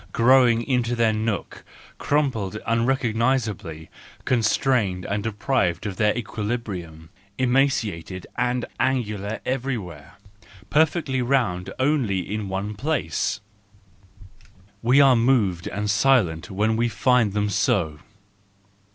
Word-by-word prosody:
Grown 120 -1 +4
into 120 -2 0
their 115 -2 +2
nook, 110 -1 -3 0.4
crumpled 130 -10 0
into 110 - -8
unrecognisability, 115 - 0 0.4
constrained, 110 -5 +1 0.2
deprived 105 -4 -1
of 100 -3 -4
their 105 +2 +2
equilibrium, 105 -8 -5 0.3
emaciated 120 -9 0
and 125 0 0
angular 110 -5 -1
everywhere, 110 - -4 0.6
perfectly 150 -4 +2
round 115 -8 0
only 120 - 0
in 105 -2 -3
one 100 +3 -3
place,—we 115 - -2 1.5
are 135 -2 +6
moved 115 -8 +1
and 105 +1 -3
silent 100 -6 +2
when 105 +3 0
we 120 +1 +1
find 125 -5 +2
them 105 0 0
so. 90 -6 0
110 Hz, 100 wpm, -23 LUFS, 100-130 Hz, 1.5 s, are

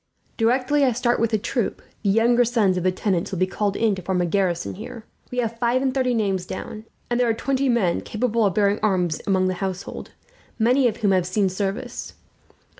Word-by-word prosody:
"Directly 255 +5 +2
I 255 -3 +3
start 240 +1 +1
with 230 - +2
the 220 - +1
troop, 230 +2 -2 0.2
the 205 - 0
younger 235 +4 +4
sons 225 -6 +2
of 180 - -1
the 185 - +3
tenants 185 -1 -1
will 190 - -3
be 185 - +3
called 200 +1 -2
in 220 -2 +2
to 190 - -5
form 185 +1 -1
a 175 - +2
garrison 175 -1 0
here. 230 +2 -9 0.2
We 250 - -7
have 230 -1 -1
five 245 +2 +1
and 265 -1 +1
thirty 255 -2 +1
names 195 -5 -1
down, 215 +3 -7 0.3
and 240 - +1
there 245 -1 +3
are 225 - +1
twenty 270 +3 0
men 200 -8 +1
capable 230 0 0
of 195 -4 +1
bearing 205 -1 +2
arms 180 -6 +1
among 190 -1 +2
the 185 - 0
household, 190 0 -4 0.5
many 245 +3 +3
of 230 - -2
whom 205 -3 +1
have 185 -2 +2
seen 195 +1 +1
service. 205 +6 -4
215 Hz, 215 wpm, -23 LUFS, 190-240 Hz, 0.5 s, younger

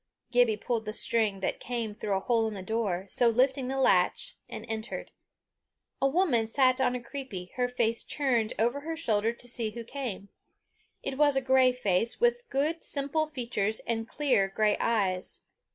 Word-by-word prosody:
Gibbie 245 -3 +4
pulled 230 0 -2
the 215 - -4
string 215 -4 +2
that - - -2
came 235 -3 -3
through 205 -1 -3
a - - -3
hole 225 +1 +1
in 215 - -5
the 190 - -6
door, 195 -3 -1
so 235 +5 +3
lifting 260 +3 +2
the 270 +1 -2
latch, 270 - +2
and - - -7
entered. 220 +2 -5 0.9
A 275 - +4
woman 275 -8 +2
sat 255 +2 +3
on 250 -1 +2
a - - -2
creepie, 240 -8 -7
her 250 -1 0
face 235 -2 0
turned 245 -6 0
over 240 +5 +1
her 320 +2 -5
shoulder 225 -8 +1
to 235 +1 -5
see 235 -2 -1
who 235 +2 -7
came. 230 -6 -6 0.7
It 270 0 -4
was 290 -2 +5
a - - +4
grey 260 -1 +4
face, 225 -3 0
with 485 0 +1
good 310 +3 -1
simple 290 +2 -1
features 235 -7 -2
and 225 -1 -3
clear 255 -10 +2
grey 210 +2 +1
eyes. 195 -5 0
235 Hz, 180 wpm, -29 LUFS, 220-270 Hz, 0.9 s, was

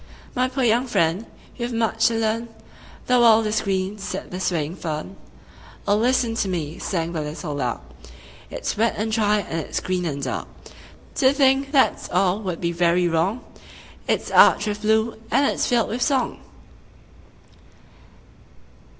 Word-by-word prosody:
"My 255 0 +1
poor 260 +1 -2
young 240 +2 +2
friend, 170 -1 0 0.3
you 240 - -4
have 240 0 -3
much 225 0 +2
to 230 - 0
learn: 225 +1 -1 0.6
The 250 -1 +3
world 225 -2 +6
is 215 +1 0
green," 195 +1 -2
said 195 - -6
the 180 - -5
swaying 170 -2 -2
fern. 160 +3 -5 0.7
"O 205 - +4
listen 240 +1 +2
to 200 - 0
me," 165 -2 -4
sang 170 -3 -2
the 160 - -2
little 150 +1 -5
lark: 125 - -2 0.7
"It's - - -4
wet 225 +2 +1
and 220 +1 -2
dry, 210 -2 +2
and 165 -3 -4
it's - - -3
green 180 -1 -2
and 140 -4 -3
dark. 125 - -3 0.7
To 260 0 +5
think 275 0 +2
that's 275 -3 +2
all 185 +2 +1
would 185 -5 -4
be 170 -1 -1
very 175 +1 +2
wrong; 175 +8 0 0.7
It's - - -1
arched - - +6
with 210 0 -3
blue, 220 +1 +1
and 275 +4 +3
it's - - 0
filled 240 -2 +1
with 240 +3 -3
song." 270 0 0
210 Hz, 160 wpm, -23 LUFS, 175-235 Hz, 0.7 s, world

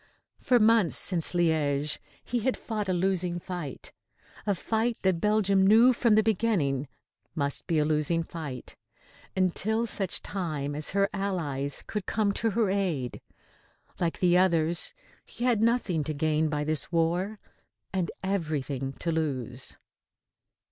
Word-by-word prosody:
For 250 - +3
months 220 -5 +4
since 175 -3 +2
Liège 150 -4 +1 0.2
he 240 - -1
had 255 +3 0
fought 210 -3 -3
a - - +3
losing 180 -1 0
fight, 175 -6 -6 0.6
a 200 - +2
fight 225 +5 -1
that 185 -3 +2
Belgium 200 -2 +3
knew 230 +5 +7
from 235 -2 +3
the 215 - +5
beginning 180 - +1 0.5
must 140 -3 -1
be 165 -3 +1
a 150 - +3
losing 155 +2 +1
fight, 155 -6 -7 0.6
until 210 +5 +1
such 195 -5 -2
time 155 -7 -3
as 150 0 -2
her 200 +1 +2
allies 155 -9 -2
could 210 -4 -4
come 210 -2 +1
to 225 - 0
her 215 -2 +1
aid. 175 -11 -1 0.8
Like 170 -2 -1
the 180 -1 +5
others, 170 -2 +2 0.3
he - - -8
had 240 -4 +2
nothing 225 -9 +1
to 155 - -3
gain 155 +1 +1
by 150 -1 -1
this 155 0 -2
war 175 +5 0 0.6
and 185 -3 0
everything 145 -8 -2
to 165 - -3
lose. 135 -6 -2
175 Hz, 140 wpm, -28 LUFS, 155-205 Hz, 0.8 s, knew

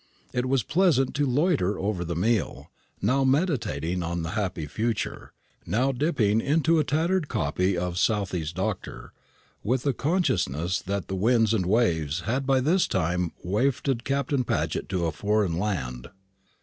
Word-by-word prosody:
It 125 +1 0
was 130 -3 +2
pleasant 150 - +2
to 145 0 +1
loiter 130 - +1
over 100 -3 -2
the 85 0 -4
meal, 105 +3 -1 0.3
now 130 +6 +3
meditating 125 - 0
on 85 0 -2
the 85 - -4
happy 95 -6 -2
future, 110 +8 -3 0.3
now 120 +9 +1
dipping 120 -6 +1
into 160 +4 +2
a - - +3
tattered 160 +3 0
copy 90 - 0
of 90 0 -2
Southey's 90 -7 0
"Doctor;" - - -4 0.5
with 120 +4 0
the 140 - +1
consciousness 95 - 0
that 100 0 -3
the - - -5
winds 115 +3 +3
and 95 -5 0
waves 85 -7 +1
had 125 +8 -2
by 135 -1 +3
this 175 +7 +2
time 90 -1 0
wafted 120 +5 0
Captain 140 -1 0
Paget - - -2
to 90 -2 0
a 80 - 0
foreign 105 -3 0
land. 65 -12 -3
110 Hz, 150 wpm, -26 LUFS, 90-135 Hz, 0.5 s, now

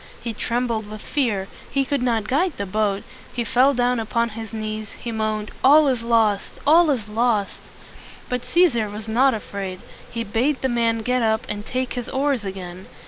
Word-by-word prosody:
He 235 - -4
trembled 230 -2 -1
with 215 0 -8
fear; 220 -10 0 0.2
he 275 -1 +1
could 285 -1 -1
not 230 -4 0
guide 320 - +1
the 200 - -2
boat; 200 0 0 0.3
he 240 - -2
fell 255 +5 +3
down 245 0 +2
upon 230 +1 0
his 225 -1 -7
knees; 215 -1 -5
he 235 - -6
moaned, 215 -1 -2
"All 295 +3 +7
is 250 -3 0
lost! 225 -3 +1
all 320 +3 +6
is 240 -7 0
lost!" 215 -2 0 0.7
But 250 -1 -2
Cæsar 240 - +2
was 210 +1 -7
not 250 +3 +3
afraid. 195 -3 -5 0.3
He 230 -1 -3
bade 245 +7 0
the 265 - +2
man 230 -2 +1
get 250 +2 +1
up 220 -1 +1
and 210 0 -5
take 255 0 -2
his 245 -1 -4
oars 270 -3 0
again. 185 -2 -7
230 Hz, 185 wpm, -22 LUFS, 215-255 Hz, 0.7 s, All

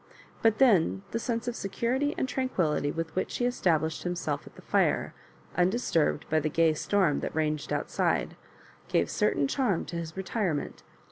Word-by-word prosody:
But 225 -1 +4
then 175 - +4
the 230 - -1
sense 230 0 -2
of 245 - -2
security 250 +9 -1
and 265 - 0
tranquillity 185 - 0
with 165 0 -4
which 185 - -1
he 245 - 0
esta 245 -7 +1
blished 160 +1 -3
himself 175 -1 -3
at - - -14
the - - -13
fire, - - +1 0.4
uudisturbed 180 -5 +1
by 155 - +2
the 155 0 -1
gay 165 +1 +3
storm 170 -2 +1
that - - -4
ranged 155 -1 -1
outside, - - 0 0.5
gave - - +2
a - - -14
certain 140 - +1
charm 205 - 0
to 170 - -5
his 165 +1 -6
retirement. 190 -5 -2
180 Hz, 175 wpm, -28 LUFS, 155-230 Hz, 0.5 s, But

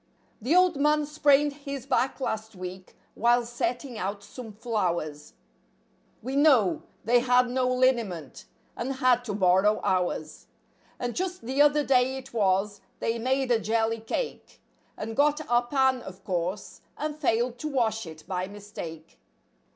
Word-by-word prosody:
The 265 +10 +1
old 365 -4 +4
man 300 +1 +3
sprained 290 -1 +3
his 280 -2 -7
back 265 0 0
last 220 -4 -3
week 185 0 -8 0.2
while 240 +1 +3
setting 240 +1 -3
out 200 +1 -3
some 235 +1 -9
flowers; 175 -9 -2 0.9
We 260 +2 -3
know—they 245 - +3
had 250 0 +3
no 255 0 +1
liniment, 235 - 0 0.3
and 260 +3 -3
had 255 -2 +3
to 210 -4 -3
borrow 190 +2 +3
ours; 175 -4 -1 0.5
And 245 -1 -3
just 370 0 -3
the 265 +4 +1
other 295 0 +5
day 260 -1 +2
it 265 -1 -10
was, 200 -1 +1 0.2
they 230 0 -1
made 260 +2 0
a 230 - +4
jelly 225 +1 0
cake. 340 - -5 0.4
And 225 +1 -5
got 295 +2 +2
our 240 0 +2
pan, 265 -1 +2
of 190 -2 -11
course, 185 +2 -3 0.2
and 300 0 -3
failed 245 -4 0
to 305 - -3
wash 225 - 0
it, 160 -1 -10
by 185 0 -2
mistake. 195 -6 -9
240 Hz, 145 wpm, -27 LUFS, 205-270 Hz, 0.9 s, other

